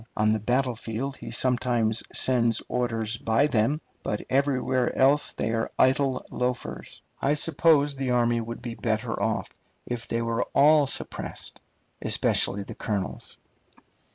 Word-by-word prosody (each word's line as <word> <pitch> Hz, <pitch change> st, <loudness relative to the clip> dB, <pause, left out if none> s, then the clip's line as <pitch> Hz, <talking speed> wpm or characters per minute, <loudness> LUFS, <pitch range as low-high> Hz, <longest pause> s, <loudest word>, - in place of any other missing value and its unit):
On 110 Hz, 0 st, +3 dB
the 110 Hz, -, 0 dB
battlefield 125 Hz, +2 st, -2 dB
he -, -, -8 dB
sometimes 120 Hz, -3 st, +1 dB
sends 120 Hz, -3 st, +2 dB
orders 115 Hz, -2 st, -1 dB
by 115 Hz, +5 st, +2 dB
them, 140 Hz, +2 st, +1 dB, 0.2 s
but 105 Hz, -, -3 dB
everywhere 130 Hz, -2 st, +1 dB
else 140 Hz, +3 st, +4 dB
they 115 Hz, -, -2 dB
are 115 Hz, 0 st, -1 dB
idle 130 Hz, 0 st, +2 dB
loafers. 125 Hz, 0 st, -4 dB, 0.2 s
I 145 Hz, +2 st, +2 dB
suppose 150 Hz, -1 st, +3 dB
the 135 Hz, -1 st, -3 dB
army 120 Hz, -1 st, +2 dB
would 115 Hz, +1 st, -7 dB
be 120 Hz, -2 st, -4 dB
better 110 Hz, +1 st, -2 dB
off 110 Hz, -1 st, -1 dB, 0.3 s
if 120 Hz, -1 st, -4 dB
they 115 Hz, 0 st, -1 dB
were 115 Hz, 0 st, -1 dB
all 145 Hz, 0 st, +6 dB
suppressed, -, -, -6 dB, 0.4 s
especially 100 Hz, 0 st, +1 dB
the -, -, -8 dB
colonels. 100 Hz, -4 st, -4 dB
120 Hz, 135 wpm, -26 LUFS, 115-135 Hz, 0.4 s, all